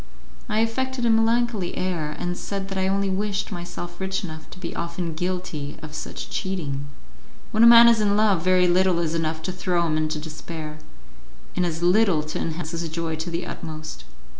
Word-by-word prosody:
I 215 +1 +2
affected 255 +2 -1
a 230 - +4
melancholy 225 -3 +2
air, 165 -5 -2
and 175 0 -2
said 195 +1 -4
that 195 - -3
I 190 - +1
only 195 +1 +1
wished 200 +2 -1
myself 175 -1 -6
rich 190 +2 -1
enough 155 -3 -7
to - - -12
be 180 -2 -6
often 170 0 -3
guilty 175 -4 -3
of 155 -1 -8
such - - -6
cheating. 145 -7 -3 0.6
When 220 - +2
a 230 - +9
man 235 0 +10
is 230 -2 +5
in 205 -1 +3
love 205 -5 +3
very 180 +1 +4
little 180 0 +3
is 165 -2 0
enough 160 -1 -1
to 185 - -2
throw 180 -1 0
him 155 -1 +1
into 155 0 0
despair, 155 0 -7 0.8
and 180 -1 +1
as 165 0 -3
little 180 -3 +4
to 155 +1 -4
enhance 160 0 -3
his 170 -1 -3
joy 165 0 -2
to 160 +3 -4
the 170 +1 -3
utmost. 155 -1 -7
175 Hz, 190 wpm, -24 LUFS, 160-195 Hz, 0.8 s, man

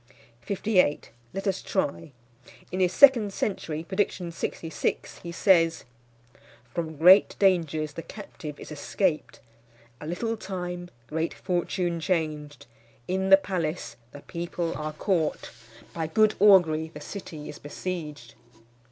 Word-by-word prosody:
Let 195 +2 -5
us 195 -2 0
try. 165 -4 -2 0.6
In 185 - -3
his 180 -1 +3
second 230 -4 +6
century, 160 -7 -3
prediction 185 -1 -2
66, 165 0 -3
he 170 - -7
says: 170 -3 +3 0.9
"From 160 -3 -4
great 185 +6 +7
dangers 160 -6 +2
the 165 - -6
captive 160 -7 -9
is - - -10
escaped. 155 +3 -2 0.6
A 150 - -8
little 225 +7 -2
time, 180 -3 -5 0.2
great 160 +6 -2
fortune 175 -1 -1
changed. 155 -4 -2 0.4
In 190 +1 0
the 195 - +10
palace 175 -8 -3 0.2
the 145 - -11
people 170 0 -4
are 155 0 -4
caught. 165 -1 -1 0.4
By 165 -2 -2
good 215 +6 +3
augury 170 -6 +5
the 150 - -9
city 160 -5 -8
is - - -9
besieged." 150 -5 -6
170 Hz, 120 wpm, -27 LUFS, 155-190 Hz, 0.9 s, the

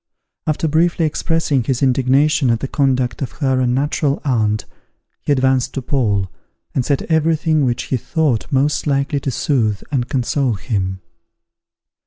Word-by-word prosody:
After 155 +1 0
briefly 165 +2 +2
expressing 155 -3 0
his 130 +2 -1
indignation 135 +2 +3
at 115 -1 +2
the 135 - -3
conduct 130 -2 0
of 130 - -3
her 130 -4 0
unnatural 135 +3 0
aunt, 110 -5 +1 0.6
he - - -2
advanced 130 -1 +1
to 135 - -2
Paul, 105 -8 0 0.5
and 130 - 0
said 140 +1 0
every 160 0 +2
thing 155 -2 +1
which 120 -2 -1
he 130 - -1
thought 145 -1 -1
most 145 +3 +1
likely 140 0 +1
to 140 - -3
soothe 115 -6 0
and 130 -3 -1
console 130 0 0
him. 95 -4 -3
135 Hz, 150 wpm, -18 LUFS, 125-150 Hz, 0.6 s, indignation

